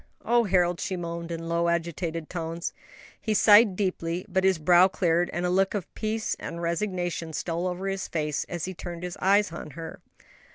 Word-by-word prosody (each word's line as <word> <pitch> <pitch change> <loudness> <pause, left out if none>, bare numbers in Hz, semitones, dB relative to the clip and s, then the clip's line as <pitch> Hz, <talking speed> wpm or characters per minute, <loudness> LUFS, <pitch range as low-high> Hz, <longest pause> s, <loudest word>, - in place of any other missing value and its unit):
"Oh 240 0 +3
Harold!" 180 -3 +2
she 190 - -2
moaned, 170 -1 -5
in 165 0 -5
low, 170 0 +1
agitated 165 -1 -2
tones. 165 -1 -4 0.5
He 215 -2 0
sighed 210 0 +7
deeply, 180 -3 -2
but 190 -1 0
his 190 -2 +4
brow 175 +4 +6
cleared, 175 -2 +1
and 175 +1 -2
a - - +1
look 195 +2 +2
of 195 -4 -5
peace 220 0 -2
and 170 - -6
resignation 170 -1 -2
stole 170 +3 -2
over 180 +2 -3
his 195 0 -2
face 150 -3 -1
as 175 -2 -3
he 185 - -5
turned 175 -1 -7
his 180 -1 -4
eyes 200 0 +4
on 165 -2 -7
her. 165 -1 -7
175 Hz, 190 wpm, -27 LUFS, 170-190 Hz, 0.5 s, sighed